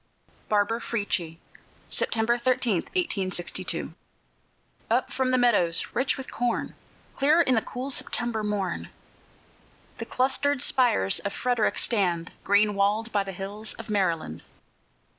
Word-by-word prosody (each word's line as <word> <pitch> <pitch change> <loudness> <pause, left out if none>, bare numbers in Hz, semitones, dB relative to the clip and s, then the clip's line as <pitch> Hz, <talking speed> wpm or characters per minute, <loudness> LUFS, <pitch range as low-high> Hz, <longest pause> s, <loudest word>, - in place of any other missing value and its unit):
BARBARA 215 +2 +1
FRIETCHIE 180 -8 -2 0.5
[September 225 +1 +1
13, 240 -4 +1
1862] 190 - -2 1.0
Up - - +1
from 260 -1 0
the 255 - +3
meadows 205 -9 +3
rich 260 +3 +1
with 265 - -8
corn, 245 -1 -1 0.4
Clear 295 +4 +4
in 260 -6 +3
the 225 - +3
cool 255 +5 -5
September 235 -4 -1
morn, 205 -4 -2 1.1
The - - -4
clustered 275 +2 +1
spires 170 - +3
of 200 - -4
Frederick 245 -2 0
stand 180 -7 0
Green 205 +1 +4
walled 205 +3 +1
by 205 -1 +1
the 195 - -6
hills 200 +3 -5
of - - -8
Maryland. 170 - -1
215 Hz, 125 wpm, -26 LUFS, 195-250 Hz, 1.1 s, Clear